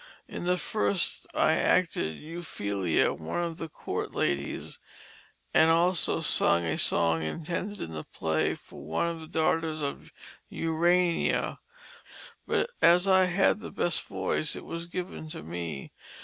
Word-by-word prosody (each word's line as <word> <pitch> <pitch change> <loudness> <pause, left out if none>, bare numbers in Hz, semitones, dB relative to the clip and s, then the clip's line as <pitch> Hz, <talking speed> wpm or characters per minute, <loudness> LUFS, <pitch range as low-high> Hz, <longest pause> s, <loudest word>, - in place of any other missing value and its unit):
In - - -6
the 180 0 +2
first 100 - 0
I - - +4
acted 80 0 +2
Euphelia, 100 - -1
one 80 - -3
of 170 0 -4
the 165 - -5
court - - -4
ladies, 70 0 -2 0.7
and 160 - +6
also 170 +2 +3
sung 85 0 +3
a 80 - 0
song 80 -1 +3
intended 170 - -3
in 80 - -5
the 80 -1 -5
play 80 -1 -1
for - - -13
one 80 - -1
of 170 -1 -2
the 160 - -9
daughters 160 -1 0
of 140 - -5 0.4
Urania, 170 +2 +1 0.9
but 480 - +1
as 175 +3 +6
I 190 -1 +6
had 190 +3 +3
the 220 - -7
best 175 - 0
voice 95 +10 -1
it - - -8
was 170 +1 -5
given 175 -2 -5
to 115 - -7
me. 85 -3 -5
160 Hz, 145 wpm, -28 LUFS, -, 0.9 s, and